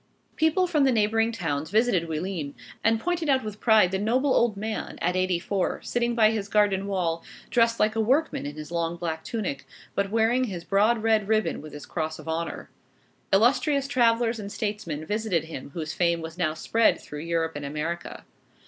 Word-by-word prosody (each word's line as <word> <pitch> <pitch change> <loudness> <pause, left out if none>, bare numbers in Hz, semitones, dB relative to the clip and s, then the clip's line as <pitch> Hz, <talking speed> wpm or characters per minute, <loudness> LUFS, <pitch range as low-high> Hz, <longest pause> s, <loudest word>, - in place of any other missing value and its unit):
People 320 +4 +3
from 315 -5 +2
the 270 - +4
neighboring 225 0 +2
towns 160 -8 -3
visited 200 -5 +2
Oullins, 160 -2 -3 0.3
and 225 0 +3
pointed 345 +1 -1
out 265 -1 +3
with 215 -1 -6
pride 215 -6 +5
the 190 - -1
noble 255 +6 +2
old 230 -4 +2
man 215 +2 -4
at 180 +1 0
eighty 185 -1 +1
four, 185 +2 -1
sitting 240 0 0
by 220 -2 +5
his 210 -3 -2
garden 200 -2 +2
wall, 170 -4 -1 0.3
dressed 230 -1 +3
like 215 +1 +2
a 225 - +2
workman 260 - +1
in 145 - -7
his 155 +1 -8
long 170 0 -1
black 160 -2 -4
tunic, 200 - -3 0.3
but 200 0 0
wearing 230 +4 +2
his 180 -7 -5
broad 215 +4 +2
red 220 -3 +2
ribbon 215 -1 +1
with 155 0 -10
his 145 0 -9
cross 160 -2 -3
of - - -12
honor. 165 +1 -4 0.6
Illustrious 275 +7 +3
travellers 235 -3 +2
and 200 -1 -6
statesmen 205 -9 -3
visited 210 -4 0
him 160 -4 -8
whose 160 -2 -4
fame 170 -1 +1
was 160 0 -7
now 165 -3 0
spread 225 +7 +2
through 150 - -8
Europe 165 0 -1
and 145 - -5
America. 150 +4 -4
200 Hz, 190 wpm, -26 LUFS, 165-230 Hz, 0.6 s, pride